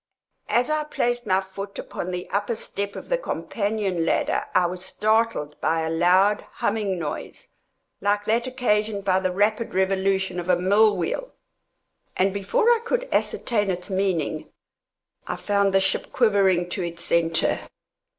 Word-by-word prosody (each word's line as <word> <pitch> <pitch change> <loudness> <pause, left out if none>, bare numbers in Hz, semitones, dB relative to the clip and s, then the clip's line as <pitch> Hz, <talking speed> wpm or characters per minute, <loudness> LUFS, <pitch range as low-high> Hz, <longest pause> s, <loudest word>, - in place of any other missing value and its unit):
As 245 +5 +2
I 305 0 0
placed 240 -5 -1
my 190 0 +3
foot 195 +1 -8
upon 180 - -5
the 180 0 -4
upper 205 +3 0
step 200 -2 -5
of - - -8
the - - 0
companion 200 - -2
ladder, - - 0
I 180 - +5
was 180 +1 -4
startled 215 -6 0
by 165 0 +1
a 160 0 -2
loud, 185 +5 +4
humming 205 -3 -1
noise, 155 -4 -6 0.5
like 205 +1 0
that 235 +3 +1
occasioned 210 -5 0
by 185 -1 +3
the 185 -1 -1
rapid 210 +3 0
revolution 190 -1 +1
of 175 +1 -5
a 180 - +6
mill 200 +3 +4
wheel, 340 - -3 0.8
and 190 +1 +2
before 455 - +2
I 470 - +4
could - - -1
ascertain 210 -4 0
its 180 +2 -3
meaning, 185 -5 -1 0.8
I - - -2
found 200 -1 +1
the 195 - +4
ship 190 0 -1
quivering 195 -6 +3
to 190 - -2
its 170 -1 -4
centre. 165 -1 +2
195 Hz, 155 wpm, -24 LUFS, 180-215 Hz, 0.8 s, a